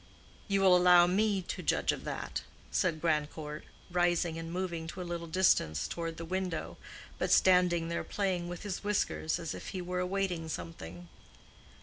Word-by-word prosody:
"You 195 -1 +2
will 190 -2 +7
allow 180 -1 +7
me 195 +1 +1
to - - -5
judge - - +2
of - - -6
that," - - -4 0.3
said 165 -4 +1
Grandcourt, 150 -1 -2 0.3
rising 175 -2 +1
and 165 0 -6
moving 170 -2 -3
to 180 +2 -6
a - - -7
little 170 -1 -4
distance 160 - +2
toward 165 -1 -4
the 165 - -6
window, 185 -1 -3 0.4
but - - 0
standing 180 -2 +4
there 170 - -2
playing 185 -4 -1
with 175 +3 -6
his 205 -1 -4
whiskers 205 -5 0
as 165 - -4
if - - -8
he 190 - -4
were 180 +1 -2
awaiting 180 -3 -1
something. 85 - -7
175 Hz, 165 wpm, -31 LUFS, 165-185 Hz, 0.4 s, will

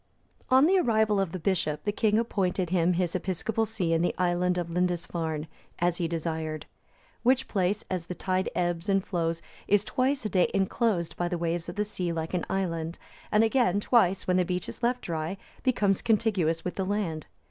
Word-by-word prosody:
(296) 255 - +4
On 270 - +6
the 375 +3 +4
arrival 215 -2 +3
of 195 -4 0
the 185 - -4
bishop, 160 -4 -1
the 205 - 0
king 210 0 +2
appointed 190 -6 0
him 180 -1 +3
his 175 -1 0
episcopal 195 +5 -1
see 185 -7 -1
in 165 - +2
the 175 - 0
island 180 0 +1
of 170 -1 -3
Lindisfarne,(297) 170 -3 -1 0.3
as 175 0 +1
he 170 - 0
desired. 160 -2 -3 0.6
Which 260 +2 +3
place, 195 0 0
as 180 -3 -3
the 180 - -5
tide 185 0 -1
ebbs 175 +1 -1
and 195 -1 +2
flows, 165 -2 -1 0.2
is 205 0 +4
twice 260 +2 0
a - - 0
day 185 -2 +3
enclosed 195 -2 0
by 175 - 0
the 175 - -2
waves 170 0 -2
of 175 - -7
the 210 0 0
sea 180 -4 -3
like 165 0 -3
an 180 - -1
island; 170 -3 -2 0.3
and 210 +1 +5
again, 225 -4 +3
twice, 195 -4 +3
when 180 0 +3
the 180 - +4
beach 180 0 -2
is - - -8
left 245 +1 +1
dry, 165 +3 -3 0.2
becomes 205 -7 +2
contiguous 205 -8 +1
with 180 - -4
the 190 - 0
land. 185 -6 -2
180 Hz, 200 wpm, -28 LUFS, 170-205 Hz, 0.6 s, On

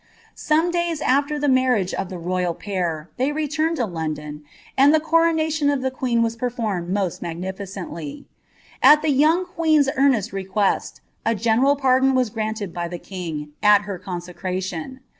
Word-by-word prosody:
Some 320 +3 +1
days 345 -2 -1
ai\er 285 +3 +1
the 290 0 -1
marriage 255 -8 +2
of 190 - -3
the 185 - -6
loyal 180 0 -1
pair, 170 -6 -3
they 260 +3 +1
nmetl 310 +2 -1
to 245 - 0
London, 155 -4 -5 0.3
and 275 +2 +6
the - - +4
coronation 320 -2 +2
of 280 -2 0
the 260 - 0
queen 245 -3 0
waa 230 - +1
performed 225 -8 -2
M 185 - -1
magnilicenily. 185 -3 -5 0.6
At 300 +1 +7
the 310 - +2
young 315 +6 +3
queen's 315 -5 +2
earnest 260 -8 +2
request, 195 +1 -1 0.2
a 225 - +1
general 235 +6 +3
■don 265 0 +3
was 250 -4 +1
granted 215 -4 -3
by 175 -1 -3
the 175 +1 -6
king, 165 -5 -6
at 210 -1 +5
her 200 -3 -6
consecration."' 185 +4 -5
225 Hz, 160 wpm, -22 LUFS, 180-285 Hz, 0.6 s, At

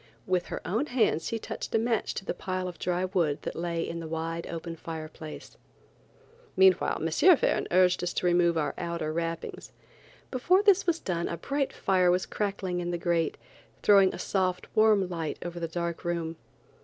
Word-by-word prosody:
With 185 -2 0
her - - -6
own 230 +10 0
hands 230 - +1
she 230 - -1
touched 225 - -5
a - - +6
match 225 -1 0
to 195 - -5
the - - -2
pile 185 -1 -3
of 175 -2 -8
dry 180 +1 0
wood 170 -6 0
that - - -4
lay 170 0 -2
in 170 - -4
the 165 - -6
wide 165 +1 -3
open 165 0 -5
fireplace. 155 -1 -8 1.0
Meanwhile 190 -1 +4
M. 330 - +6
Verne - - +1
urged 180 0 +4
us 180 -1 -1
to - - -2
remove 175 -1 +3
our 150 - 0
outer 170 -2 -3
wrappings. 165 0 -4 0.6
Before 360 +10 +3
this 400 -3 +4
was 335 -1 +2
done 170 - -2
a 170 - -4
bright 275 - -1
fire 185 -2 +2
was 180 +1 +2
crackling 195 -3 -2
in 175 0 -3
the 175 - -1
grate, 170 -2 0 0.5
throwing 195 -2 +6
a - - -7
soft, 185 -2 -1
warm 215 -3 +4
light 165 -3 -4
over 175 0 -5
the 165 - -2
dark 170 0 -4
room. 170 -1 -2
175 Hz, 185 wpm, -28 LUFS, 165-195 Hz, 1.0 s, a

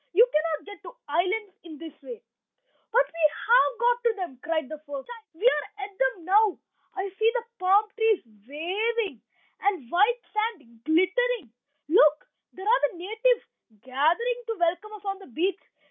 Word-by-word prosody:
You 445 +7 +7
cannot 310 0 0
get 410 0 -11
to 385 - -11
islands 370 +7 0
in 325 -3 -10
this 325 0 -9
way." 475 -2 -9 0.7
"But - - +4
we 330 -6 +2
have 480 +8 +3
got 485 0 +2
to 470 -1 +3
them," 350 -10 -6
cried 315 -2 -1
the 310 +2 -8
first 285 -3 -8
child. 470 -2 -10
"We 385 +8 -5
are 415 -4 +1
at 400 0 -13
them 320 +4 -1
now. 410 +1 +4 0.4
I 390 +1 -2
see 445 +1 +4
the 480 - 0 0.2
palm 385 +3 +4
trees 445 -3 +2
waving, 330 - -3 0.4
and 390 -7 0
the 235 - -19
white 420 +7 +3
sand 340 - -3
glittering. 375 - +1 0.3
Look! 305 -2 +4 0.2
there 380 +2 -8
are 480 +3 +4
the - - -13
natives 445 +7 +1 0.4
gathering 345 - +1
to 455 - -2
welcome 350 +5 -1
us 415 -1 -11
on 390 0 -3
the 390 - -13
beach. 355 +9 -1
385 Hz, 175 wpm, -26 LUFS, 315-445 Hz, 0.7 s, You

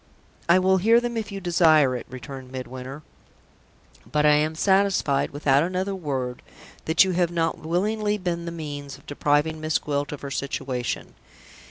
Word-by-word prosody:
"I 170 - +7
will 190 +1 +3
hear 225 +5 +5
them 240 0 -3
if 220 -2 -3
you 200 - -5
desire 160 -7 +4
it," 125 - -6
returned 130 +1 -9
Midwinter. 130 +2 -7 1.1
"But 150 0 +2
I 150 - +6
am 155 +2 +1
satisfied, 190 -6 +2
without 140 -1 +2
another 185 +3 -1
word, 135 -8 -3 0.4
that 160 +3 +5
you 190 - 0
have 175 -1 +1
not 165 -1 -1
willingly 210 +6 0
been 175 -3 -3
the 170 - -4
means 145 -4 -6
of - - -21
depriving 150 +2 0
Miss 155 0 +1
Gwilt 145 -1 -2
of 150 - -7
her 140 - -6
situation. 130 -3 -3
155 Hz, 165 wpm, -24 LUFS, 140-185 Hz, 1.1 s, I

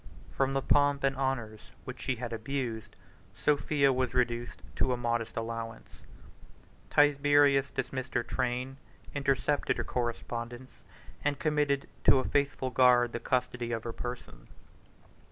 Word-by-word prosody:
From 135 0 +1
the 135 -1 0
pomp 145 -1 +3
and 135 0 +2
honors 120 -5 -3
which 125 0 -8
she 130 - -1
had 120 0 -5
abused, 115 -2 -4 0.4
Sophia 145 -1 +2
was 130 -1 -1
reduced 120 -1 -1
to 130 - +2
a - - -1
modest 120 -1 -2
allowance: 115 0 -5 0.9
Tiberius 145 -1 +4
dismissed 130 0 -4
her 120 - +2
train, 125 +2 -2 0.4
intercepted 140 +1 0
her - - -1
correspondence, 120 +1 -4 0.4
and 145 -1 +1
committed 150 -2 0 0.2
to - - +7
a 130 - +1
faithful 140 -2 0
guard 125 -2 +4
the 115 - -2
custody 125 -1 -1
of 115 -1 -2
her 115 - -5
person. 120 - -7
130 Hz, 135 wpm, -30 LUFS, 120-140 Hz, 0.9 s, to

